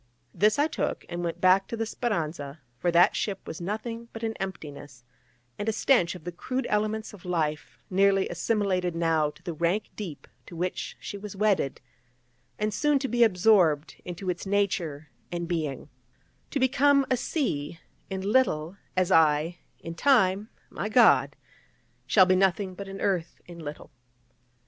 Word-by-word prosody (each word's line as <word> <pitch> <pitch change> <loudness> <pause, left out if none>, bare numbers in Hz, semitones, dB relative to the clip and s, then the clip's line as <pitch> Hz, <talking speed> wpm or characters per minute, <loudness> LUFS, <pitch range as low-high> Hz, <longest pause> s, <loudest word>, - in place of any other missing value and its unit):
This 210 +1 +3
I 290 - +4
took, - - -3
and 175 0 -4
went 170 -1 -3
back 185 +1 +4
to 230 - -5
the 225 - -1
Speranza: 160 - -3 0.2
for 175 - +1
that 175 +3 +5
ship 200 -3 -3
was 160 - -7
nothing 230 +5 -4
but 225 - -8
an 225 0 -1
emptiness, 145 -8 -7 0.6
and 205 - -1
a - - +3
stench 210 -6 +2
of 175 - -11
the 175 - -5
crude 255 +9 -3
elements 215 +1 -1
of 200 - -13
life, 160 -4 -2
nearly 195 0 +3
assimilated 180 -1 0
now 165 -2 +2
to 155 - -17
the 175 -1 -4
rank 170 +6 -1
deep 175 -9 -7 0.2
to - - -10
which 180 +2 -3
she 200 - -7
was 205 0 -8
wedded, 195 -9 +1 0.8
and 210 0 -1
soon 295 +5 +2
to 270 0 -2
be 240 -1 +3
absorbed 180 -7 +3
into 180 +2 -7
its 180 +1 -2
nature 180 -7 -1 0.2
and 175 -1 -3
being, 155 -6 -3 0.6
to 280 - -2
become 275 +2 +4
a - - +5
sea 170 - -2 0.3
in 190 0 -3
little, 195 -6 +1 0.2
as 185 0 +2
I, 160 +1 +3 0.2
in 165 - -6
time, 210 -2 +3 0.2
my 205 - -3
God, 145 - +5 0.7
shall 185 - +6
be 185 0 +3
nothing 190 0 +1
but 195 +2 -8
an 195 0 -7
earth 180 -4 -1
in 175 -1 -11
little. 150 -2 -8
185 Hz, 165 wpm, -27 LUFS, 165-215 Hz, 0.8 s, shall